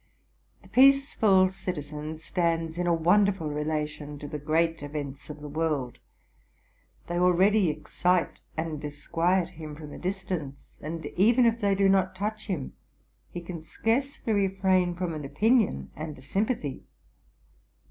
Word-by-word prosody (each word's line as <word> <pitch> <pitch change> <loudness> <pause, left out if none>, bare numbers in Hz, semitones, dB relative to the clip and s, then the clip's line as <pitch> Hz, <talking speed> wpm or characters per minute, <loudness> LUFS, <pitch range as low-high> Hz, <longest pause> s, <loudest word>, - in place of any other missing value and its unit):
The - - -16
peaceful 250 -8 +5
citizen 155 -5 -5
stands 165 0 -1
in 175 - 0
a - - +3
wonderful 175 0 +3
relation 150 -1 -3
to 145 - -7
the 150 0 -5
great 165 +2 +1
events 145 -1 -6
of 150 0 -8
the 150 - -6
world. 150 -4 -2 1.1
They 175 0 -2
already 185 +2 +4
excite 175 +3 0 0.2
and 160 -2 -3
disquiet 165 +5 0
him 155 -4 -9
from 150 -1 -9
a - - -8
distance; 180 -7 -5
and, 160 +2 -5
even 235 +6 +5
if 230 0 +2
they 200 -1 +3
do 195 0 +3
not 190 -1 +2
touch 215 +3 -4
him, 170 -10 -3 0.6
he 175 - -6
can 170 -1 -7
searcely 230 - -1
refrain 190 -3 +2
from 180 -2 -2
an 155 -1 -5
opinion 210 - +1
and 155 0 -6
a 130 - -14
sympathy. 195 - -1
170 Hz, 140 wpm, -27 LUFS, 150-195 Hz, 1.1 s, peaceful